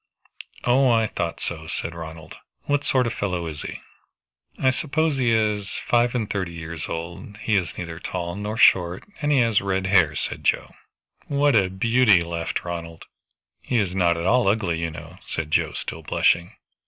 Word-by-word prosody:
"Oh 130 Hz, +2 st, +4 dB
I 115 Hz, -2 st, +4 dB
thought 85 Hz, -5 st, -3 dB
so," 80 Hz, -2 st, -4 dB
said 80 Hz, 0 st, -4 dB
Ronald. 80 Hz, -1 st, -9 dB, 0.3 s
"What 145 Hz, 0 st, 0 dB
sort 130 Hz, -3 st, +2 dB
of 115 Hz, -, -1 dB
a -, -, -10 dB
fellow 90 Hz, -4 st, -2 dB
is 80 Hz, -3 st, -6 dB
he?" -, -, -7 dB, 0.8 s
"I 130 Hz, -, +3 dB
suppose 155 Hz, +2 st, 0 dB
he 125 Hz, -3 st, +2 dB
is 105 Hz, -3 st, 0 dB
five 120 Hz, +1 st, +3 dB
and 115 Hz, -4 st, 0 dB
thirty 95 Hz, -4 st, -3 dB
years 80 Hz, -1 st, -6 dB
old; 85 Hz, +5 st, -6 dB
he 110 Hz, 0 st, 0 dB
is 90 Hz, -3 st, -1 dB
neither 85 Hz, -1 st, -6 dB
tall 85 Hz, -1 st, -4 dB
nor 105 Hz, +2 st, -4 dB
short, 90 Hz, -3 st, +4 dB, 0.2 s
and 145 Hz, 0 st, +1 dB
he 140 Hz, -3 st, +5 dB
has 115 Hz, -3 st, +3 dB
red 95 Hz, -1 st, -1 dB
hair," 95 Hz, -7 st, +4 dB
said -, -, -4 dB
Joe. -, -, +1 dB, 0.6 s
"What 145 Hz, -1 st, +3 dB
a 95 Hz, -4 st, +4 dB
beauty!" 110 Hz, 0 st, +4 dB
laughed 85 Hz, -1 st, -3 dB
Ronald. 85 Hz, -1 st, -6 dB, 0.6 s
"He 125 Hz, -, -3 dB
is 95 Hz, -4 st, 0 dB
not 85 Hz, -3 st, +3 dB
at 85 Hz, -, -3 dB
all 120 Hz, +2 st, +3 dB
ugly, 100 Hz, -5 st, +1 dB
you 85 Hz, 0 st, -1 dB
know," 80 Hz, -, -10 dB
said 80 Hz, -2 st, -4 dB
Joe, -, -, +2 dB
still -, -, -5 dB
blushing. 85 Hz, +1 st, +1 dB
95 Hz, 185 wpm, -24 LUFS, 85-115 Hz, 0.8 s, he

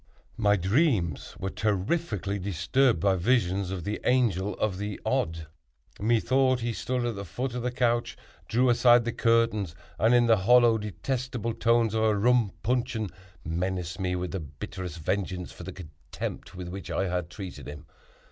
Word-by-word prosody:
My 105 Hz, -2 st, +3 dB
dreams 100 Hz, -, +1 dB
were 95 Hz, 0 st, -4 dB
terrifically 105 Hz, -, -1 dB
disturbed 100 Hz, +6 st, +1 dB
by 95 Hz, +2 st, +2 dB
visions 95 Hz, -2 st, +1 dB
of 95 Hz, -3 st, -4 dB
the 105 Hz, +4 st, -3 dB
Angel 105 Hz, -7 st, +1 dB
of 100 Hz, -3 st, -1 dB
the 105 Hz, 0 st, -4 dB
Odd. 80 Hz, 0 st, -1 dB, 0.5 s
Methought 125 Hz, +4 st, +2 dB
he 115 Hz, 0 st, -1 dB
stood 125 Hz, +1 st, -2 dB
at 120 Hz, -2 st, -2 dB
the 100 Hz, -, -5 dB
foot 120 Hz, +8 st, -4 dB
of 125 Hz, -, -3 dB
the 125 Hz, -, -1 dB
couch, 120 Hz, -1 st, 0 dB, 0.3 s
drew 125 Hz, +2 st, +3 dB
aside 120 Hz, 0 st, +5 dB
the 120 Hz, -, 0 dB
curtains, 115 Hz, -8 st, +1 dB, 0.2 s
and, 115 Hz, +3 st, +4 dB
in 120 Hz, -1 st, +5 dB
the 115 Hz, -1 st, +5 dB
hollow, 120 Hz, +3 st, +5 dB
detestable 115 Hz, +2 st, -3 dB
tones 115 Hz, -1 st, +2 dB
of 110 Hz, -, +1 dB
a 110 Hz, -1 st, +3 dB
rum 120 Hz, -1 st, +3 dB
puncheon, 120 Hz, -3 st, -1 dB, 0.3 s
menaced 90 Hz, +2 st, -2 dB
me 90 Hz, -1 st, -1 dB
with 90 Hz, 0 st, -3 dB
the 95 Hz, -, -3 dB
bitterest 85 Hz, +3 st, -7 dB
vengeance 90 Hz, +2 st, -2 dB
for -, -, -12 dB
the 90 Hz, +2 st, -6 dB
contempt 80 Hz, -1 st, -8 dB
with 90 Hz, -1 st, -6 dB
which 95 Hz, +2 st, -7 dB
I 95 Hz, -, 0 dB
had 90 Hz, -2 st, -2 dB
treated 95 Hz, 0 st, -8 dB
him. 75 Hz, +2 st, -9 dB
105 Hz, 165 wpm, -27 LUFS, 90-120 Hz, 0.5 s, aside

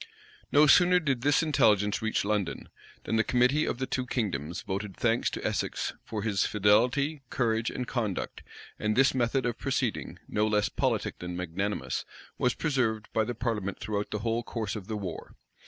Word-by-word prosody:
No 150 Hz, +1 st, +6 dB
sooner 180 Hz, +4 st, +6 dB
did 140 Hz, -7 st, -1 dB
this 145 Hz, +4 st, +3 dB
intelligence 105 Hz, -9 st, +3 dB
reach 110 Hz, -2 st, 0 dB
London, 105 Hz, -3 st, -2 dB, 0.3 s
than 115 Hz, -, 0 dB
the 110 Hz, -, +4 dB
committee 125 Hz, +6 st, +3 dB
of -, -, -2 dB
the 130 Hz, -, -2 dB
two 130 Hz, -1 st, -2 dB
kingdoms 90 Hz, -, -2 dB
voted 100 Hz, -1 st, -4 dB
thanks 115 Hz, 0 st, +2 dB
to -, -, -6 dB
Essex -, -, -1 dB
for 105 Hz, -3 st, -4 dB
his 100 Hz, -4 st, +1 dB
fidelity, 125 Hz, +9 st, +2 dB
courage, 115 Hz, -2 st, 0 dB
and 125 Hz, -, -4 dB
conduct; 110 Hz, -7 st, -3 dB, 0.4 s
and 105 Hz, 0 st, 0 dB
this 135 Hz, +2 st, +5 dB
method 125 Hz, 0 st, +1 dB
of 120 Hz, -2 st, -2 dB
proceeding, -, -, -2 dB
no 105 Hz, +1 st, +1 dB
less 105 Hz, -1 st, +2 dB
politic -, -, -1 dB
than 90 Hz, 0 st, -5 dB
magnanimous, 90 Hz, +4 st, -2 dB, 0.4 s
was 125 Hz, -2 st, +2 dB
preserved 120 Hz, -8 st, 0 dB
by 110 Hz, -, +3 dB
the 120 Hz, +2 st, -3 dB
parliament 105 Hz, -5 st, -2 dB
throughout 105 Hz, 0 st, -2 dB
the -, -, -2 dB
whole 115 Hz, +1 st, +1 dB
course 115 Hz, -1 st, -4 dB
of 100 Hz, -3 st, -7 dB
the 110 Hz, -, -3 dB
war. 95 Hz, -5 st, -6 dB
110 Hz, 175 wpm, -29 LUFS, 105-125 Hz, 0.4 s, No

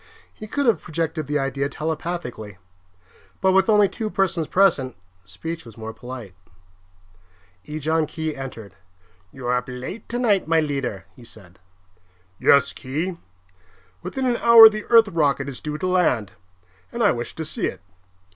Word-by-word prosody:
He 215 Hz, -, -10 dB
could 285 Hz, +6 st, -1 dB
have 230 Hz, -4 st, +3 dB
projected 160 Hz, -2 st, -3 dB
the 150 Hz, 0 st, 0 dB
idea 135 Hz, 0 st, -1 dB
telepathically; 150 Hz, -, -5 dB, 0.8 s
but 190 Hz, -, +3 dB
with 190 Hz, +2 st, +3 dB
only 210 Hz, -2 st, +5 dB
two 220 Hz, +2 st, -4 dB
persons 185 Hz, -6 st, 0 dB
present, 165 Hz, -10 st, +2 dB, 0.3 s
speech 160 Hz, -, -6 dB
was 115 Hz, -2 st, -14 dB
more 110 Hz, 0 st, -7 dB
polite. 120 Hz, -4 st, -9 dB, 1.3 s
Ejon 155 Hz, +1 st, -1 dB
Khee 155 Hz, 0 st, -4 dB
entered. 115 Hz, -7 st, -8 dB, 0.6 s
"You 130 Hz, -2 st, -10 dB
are 125 Hz, +1 st, +1 dB
up 125 Hz, 0 st, -1 dB
late 130 Hz, -, -7 dB
tonight, 230 Hz, -8 st, +1 dB
my 165 Hz, 0 st, +3 dB
leader," 135 Hz, -9 st, -3 dB
he 125 Hz, -, -15 dB
said. 95 Hz, -6 st, -15 dB, 0.8 s
"Yes, 140 Hz, -1 st, +4 dB
Khee. 160 Hz, +7 st, -4 dB, 0.8 s
Within 265 Hz, -, -4 dB
an 245 Hz, -2 st, +1 dB
hour 230 Hz, -1 st, +9 dB
the 215 Hz, -1 st, -6 dB
Earth 230 Hz, -2 st, +6 dB
rocket 145 Hz, -5 st, +1 dB
is 135 Hz, -3 st, -7 dB
due 150 Hz, 0 st, -4 dB
to 170 Hz, -, -4 dB
land, 165 Hz, -, +1 dB, 0.6 s
and 235 Hz, -1 st, -2 dB
I 205 Hz, -, +5 dB
wish 120 Hz, 0 st, -5 dB
to 160 Hz, -, -5 dB
see -, -, -2 dB
it. -, -, -7 dB
155 Hz, 155 wpm, -22 LUFS, 125-190 Hz, 1.3 s, hour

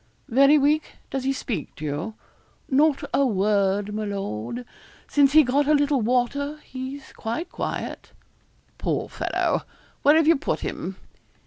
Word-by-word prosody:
'Very 275 Hz, +5 st, +6 dB
weak? 295 Hz, +2 st, +1 dB, 0.2 s
Does 265 Hz, -1 st, -2 dB
he 270 Hz, -, +2 dB
speak 225 Hz, -, -4 dB
to 155 Hz, -, -7 dB
you?' 150 Hz, +9 st, -3 dB, 0.5 s
'Not 290 Hz, +2 st, +3 dB
a 280 Hz, -, +4 dB
word, 205 Hz, -2 st, +1 dB
my 215 Hz, +1 st, -2 dB
lord. 200 Hz, -, -4 dB, 0.4 s
Since 280 Hz, -1 st, +4 dB
he 310 Hz, 0 st, +8 dB
got 280 Hz, +3 st, +1 dB
a 305 Hz, -, +5 dB
little 285 Hz, -2 st, +2 dB
water 255 Hz, +6 st, 0 dB
he's 260 Hz, +2 st, -7 dB
quite 245 Hz, +11 st, -4 dB
quiet.' -, -, -5 dB, 0.7 s
'Poor -, -, -1 dB
fellow. -, -, 0 dB, 0.4 s
Where 290 Hz, +2 st, +6 dB
have 320 Hz, -1 st, +4 dB
you 330 Hz, -, +6 dB
put 275 Hz, -, -2 dB
him?' -, -, -4 dB
265 Hz, 145 wpm, -24 LUFS, 210-290 Hz, 0.7 s, he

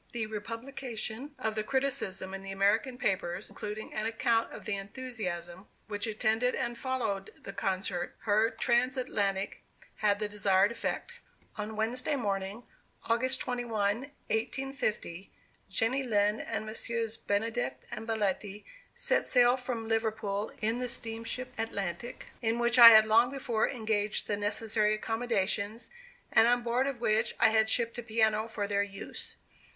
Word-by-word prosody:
The 235 Hz, -2 st, -1 dB
republication 230 Hz, +4 st, -5 dB
of 220 Hz, -, -1 dB
the 215 Hz, 0 st, -1 dB
criticism 250 Hz, -8 st, -1 dB
in 195 Hz, -, -5 dB
the 195 Hz, 0 st, -6 dB
American 215 Hz, +7 st, +2 dB
papers, 180 Hz, -6 st, -1 dB
including 210 Hz, +1 st, -6 dB
an 215 Hz, +1 st, -1 dB
account 230 Hz, 0 st, +1 dB
of -, -, -9 dB
the 215 Hz, -, -1 dB
enthusiasm 195 Hz, -5 st, -5 dB, 0.2 s
which 205 Hz, 0 st, -2 dB
attended 220 Hz, +3 st, +1 dB
and 240 Hz, -, -2 dB
followed 235 Hz, -6 st, -2 dB
this 195 Hz, -, -8 dB
concert, 190 Hz, -2 st, -2 dB
her 215 Hz, +1 st, +3 dB
trans 240 Hz, +3 st, +1 dB
Atlantic, 200 Hz, -5 st, -1 dB, 0.4 s
had 205 Hz, -1 st, +2 dB
the 210 Hz, 0 st, -1 dB
desired 200 Hz, 0 st, +3 dB
effect. 235 Hz, -, -3 dB, 0.4 s
On 215 Hz, +1 st, -5 dB
Wednesday 240 Hz, +7 st, 0 dB
morning, 200 Hz, -2 st, -2 dB, 0.4 s
August 255 Hz, +3 st, +1 dB
21, 225 Hz, -5 st, 0 dB, 0.3 s
1850, 220 Hz, -6 st, -2 dB, 0.4 s
Jenny 225 Hz, +7 st, +1 dB
Lind 210 Hz, -3 st, +2 dB
and 215 Hz, -, -3 dB
Messrs. 225 Hz, 0 st, -3 dB
Benedict 225 Hz, +4 st, -2 dB
and 220 Hz, +1 st, -6 dB
Belletti, 205 Hz, -2 st, -1 dB, 0.3 s
set -, -, +2 dB
sail 245 Hz, 0 st, +6 dB
from 245 Hz, -3 st, -4 dB
Liverpool 220 Hz, -2 st, -1 dB
in 225 Hz, +3 st, +1 dB
the 250 Hz, -1 st, -2 dB
steamship 230 Hz, +3 st, -4 dB
Atlantic, 205 Hz, 0 st, -4 dB
in 225 Hz, 0 st, +1 dB
which 240 Hz, +1 st, +3 dB
I 235 Hz, -1 st, +14 dB
had 220 Hz, -1 st, +8 dB
long 225 Hz, +3 st, +5 dB
before 245 Hz, -5 st, 0 dB
engaged 215 Hz, -4 st, -1 dB
the 205 Hz, -, -1 dB
necessary 210 Hz, +1 st, +1 dB
accommodations, 225 Hz, -1 st, -1 dB, 0.4 s
and 225 Hz, -, +6 dB
on 245 Hz, 0 st, +3 dB
board 240 Hz, +3 st, +1 dB
of 265 Hz, -4 st, -4 dB
which 220 Hz, 0 st, +1 dB
I -, -, +7 dB
had 220 Hz, 0 st, +3 dB
shipped 235 Hz, 0 st, +1 dB
a -, -, -2 dB
piano 220 Hz, -1 st, +1 dB
for 215 Hz, -2 st, -3 dB
their 200 Hz, 0 st, +1 dB
use. 200 Hz, -1 st, -5 dB
220 Hz, 145 wpm, -30 LUFS, 205-240 Hz, 0.4 s, I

